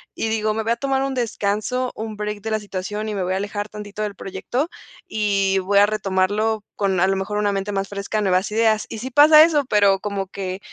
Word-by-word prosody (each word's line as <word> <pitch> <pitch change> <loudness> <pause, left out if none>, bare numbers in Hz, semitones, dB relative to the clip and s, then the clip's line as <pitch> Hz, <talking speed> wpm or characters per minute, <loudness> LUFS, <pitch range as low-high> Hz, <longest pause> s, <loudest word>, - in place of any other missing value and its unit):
y - - -2
digo: 215 -1 0
"me 220 +1 -2
voy 225 +1 +1
a - - -5
tomar 270 +1 0
un 275 0 -2
descanso, 235 +1 -1
un 220 -1 -6
break 210 0 -4
de 220 +2 -4
la 215 - +1
situación 205 +1 -5
y 210 - -3
me 195 - -1
voy 180 +1 -1
a - - 0
alejar 205 +1 -4
tantito 210 0 -8
del 205 -1 -4
proyecto 195 - -3 0.4
y 195 -2 +1
voy 200 +2 +2
a 205 - +7
retomarlo 210 +1 0
con 195 -3 0
a 190 - +4
lo 195 - +1
mejor 195 +2 -3
una 205 -1 +1
mente 195 +1 -2
más 195 0 -1
fresca, 200 +2 -3
nuevas 190 0 +1
ideas", 220 0 +2
y - - -6
si 260 - -5
pasa 305 +3 +8
eso, 310 -3 +3
pero 200 -2 +4
como 200 -2 -3
que 190 -1 -5
210 Hz, 235 wpm, -21 LUFS, 195-220 Hz, 0.4 s, pasa